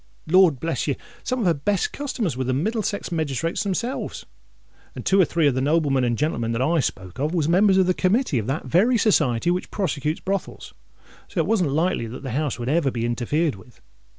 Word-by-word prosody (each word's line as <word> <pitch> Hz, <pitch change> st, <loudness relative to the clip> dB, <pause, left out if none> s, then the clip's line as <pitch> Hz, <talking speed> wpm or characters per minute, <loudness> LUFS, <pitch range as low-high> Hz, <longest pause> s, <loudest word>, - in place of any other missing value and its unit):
Lord 175 Hz, -4 st, +4 dB
bless 165 Hz, +3 st, -2 dB
you! 140 Hz, -, +1 dB, 0.3 s
some 255 Hz, -1 st, -2 dB
of -, -, 0 dB
her 170 Hz, -, +4 dB
best 180 Hz, +7 st, -1 dB
customers 235 Hz, -, -2 dB
was 130 Hz, 0 st, -3 dB
the 130 Hz, -, +1 dB
Middlesex 210 Hz, -, -2 dB
magistrates 160 Hz, 0 st, -1 dB
themselves; 225 Hz, +6 st, -3 dB, 0.7 s
and -, -, -7 dB
two 195 Hz, 0 st, +4 dB
or -, -, +5 dB
three 165 Hz, 0 st, 0 dB
of 140 Hz, -, +4 dB
the 130 Hz, -, -1 dB
noblemen 145 Hz, -2 st, +2 dB
and 120 Hz, -1 st, 0 dB
gentlemen 120 Hz, -7 st, -1 dB
that 115 Hz, -, -1 dB
I 165 Hz, +4 st, +2 dB
spoke 95 Hz, -, -4 dB
of, 150 Hz, +5 st, -1 dB
was 155 Hz, -4 st, +1 dB
members 190 Hz, +3 st, +4 dB
of 190 Hz, -, +4 dB
the 185 Hz, -, +2 dB
Committee 185 Hz, -, +1 dB
of 105 Hz, -, -4 dB
that 135 Hz, +4 st, -2 dB
very 230 Hz, +9 st, +3 dB
Society 160 Hz, -, +2 dB
which 180 Hz, +1 st, -2 dB
prosecutes 155 Hz, -5 st, -2 dB
brothels. 195 Hz, 0 st, -4 dB, 0.5 s
So -, -, -13 dB
it 160 Hz, -, +2 dB
wasn't 190 Hz, -5 st, +1 dB
likely 160 Hz, -6 st, 0 dB
that 125 Hz, +5 st, -8 dB
the 135 Hz, -, -4 dB
house 145 Hz, +2 st, -1 dB
would 120 Hz, -1 st, -5 dB
ever 150 Hz, 0 st, +2 dB
be 120 Hz, -2 st, -3 dB
interfered 135 Hz, +7 st, 0 dB
with. 100 Hz, +5 st, -16 dB
160 Hz, 210 wpm, -23 LUFS, 130-185 Hz, 0.7 s, or